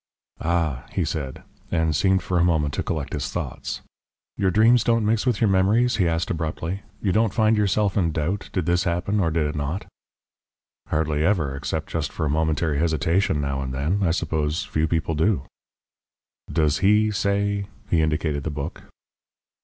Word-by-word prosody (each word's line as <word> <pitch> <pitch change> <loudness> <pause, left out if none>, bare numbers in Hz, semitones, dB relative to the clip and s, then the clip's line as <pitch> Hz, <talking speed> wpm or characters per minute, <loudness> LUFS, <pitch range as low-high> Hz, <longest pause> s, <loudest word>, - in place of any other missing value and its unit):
"Ah!" 80 -6 0
he - - 0
said, 70 -4 -4 0.3
and 80 -2 +1
seemed 95 +4 +2
for 90 -1 0
a - - +4
moment 80 -5 +1
to - - -1
collect - - -3
his - - -2
thoughts. - - -4 0.5
"Your 95 - +1
dreams 115 +5 +5
don't 115 -2 +2
mix 110 +3 +1
with 120 -5 +2
your 115 - +3
memories?" 105 +6 +3
he 90 -5 +3
asked 85 +5 0
abruptly. 80 +3 -3 0.2
"You 100 - +2
don't 110 0 +2
find 110 -1 +4
yourself 105 -1 +1
in 85 -5 +2
doubt; 85 +6 -2
did 90 -5 -1
this 90 +3 +1
happen 90 +4 0
or 85 -4 +2
did 80 -1 0
it 75 - -3
not?" 75 +6 -3 1.0
"Hardly 75 -1 0
ever. 80 -8 +1
Except 75 +3 -3
just 80 -3 -2
for 80 - -2
a 75 - 0
momentary 80 -1 +1
hesitation 80 +1 +1
now 70 -1 -2
and 65 -1 -4
then. 80 +10 0
I 95 - +2
suppose 80 +1 -1
few 80 -6 0
people 80 0 0
do." 80 0 +1 1.1
"Does 75 -1 +2
HE 105 +2 +4
say 100 0 0
" - - -29
he 85 - +4
indicated 75 -2 0
the - - -2
book. 75 +3 -5
85 Hz, 180 wpm, -24 LUFS, 75-100 Hz, 1.1 s, dreams